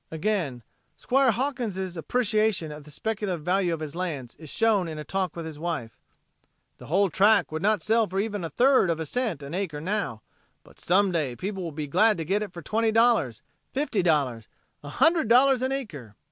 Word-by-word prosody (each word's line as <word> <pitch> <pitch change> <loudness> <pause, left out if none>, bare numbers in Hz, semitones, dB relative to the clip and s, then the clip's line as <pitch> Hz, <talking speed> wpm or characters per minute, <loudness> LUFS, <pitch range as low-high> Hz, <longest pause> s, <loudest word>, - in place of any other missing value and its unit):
Again 160 - -2 0.3
"Squire 265 - +2
Hawkins'" 225 -7 -2
appreciation 215 -3 0
of 150 -1 -10
the - - -13
speculative 195 0 -3
value 180 +1 +1
of 165 -1 -3
his 155 0 -6
lands 155 -9 -4
is 155 -2 -11
shown 210 -3 +2
in 160 -1 -6
a 150 - -5
talk 185 +2 -2
with 170 -1 -5
his 155 -2 -8
wife: 160 -9 -4 0.8
"The - - -11
whole 190 +3 +2
tract 205 +1 +4
would 155 0 -3
not 210 -3 +1
sell 225 0 +2
for 190 +2 -3
even 205 -1 -2
over 165 - -3
a - - -10
third 255 - +4
of 165 -1 0
a 160 - -3
cent 215 - -2
an 140 - -8
acre 180 -5 -3
now, 160 - -3 0.4
but - - -19
some 190 +2 +2
day 150 -8 -1
people 195 - -4
will 170 -2 -4
be 150 0 -4
glad 210 +8 +3
to 165 - -4
get 200 +6 0
it 210 -3 -4
for 170 -2 -10
twenty 225 +4 +1
dollars, 225 - +2 0.3
fifty 260 -7 0
dollars, 140 - 0 0.3
a 145 - -9
hundred 320 - +3
dollars 255 +2 +5
an 260 +1 0
acre." 155 - -5
185 Hz, 205 wpm, -26 LUFS, 155-220 Hz, 0.8 s, dollars